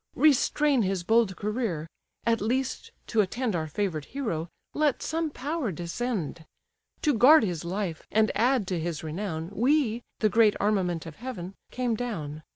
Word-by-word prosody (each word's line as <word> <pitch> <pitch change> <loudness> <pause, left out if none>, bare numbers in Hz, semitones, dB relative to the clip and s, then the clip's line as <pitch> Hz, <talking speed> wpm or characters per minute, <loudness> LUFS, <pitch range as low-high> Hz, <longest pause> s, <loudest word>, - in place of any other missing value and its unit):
Restrain 295 -2 +4
his 190 -3 0
bold 220 -1 +3
career; 210 -7 -2 0.4
at 230 -2 +2
least, 255 +5 -1 0.2
to 225 - +2
attend 225 +2 -1
Our 160 -2 -1
favour'd 160 -3 -2
hero, 175 - -3 0.2
let 300 -3 +1
some 325 0 -1
power 290 -3 -2
descend. 175 - -3 0.6
To 295 - +4
guard 265 +5 +7
his 175 -6 -2
life, 180 -2 -3
and 215 0 +3
add 240 0 +2
to 180 -3 -1
his 165 -1 -3
renown, 160 +1 -4
We, 245 -1 +2 0.2
the 215 - +3
great 220 -1 +5
armament 185 -5 +1
of 165 -2 -9
heaven, 205 -7 -6 0.2
came 250 -2 -1
down. 165 -11 -4
215 Hz, 155 wpm, -27 LUFS, 175-250 Hz, 0.6 s, guard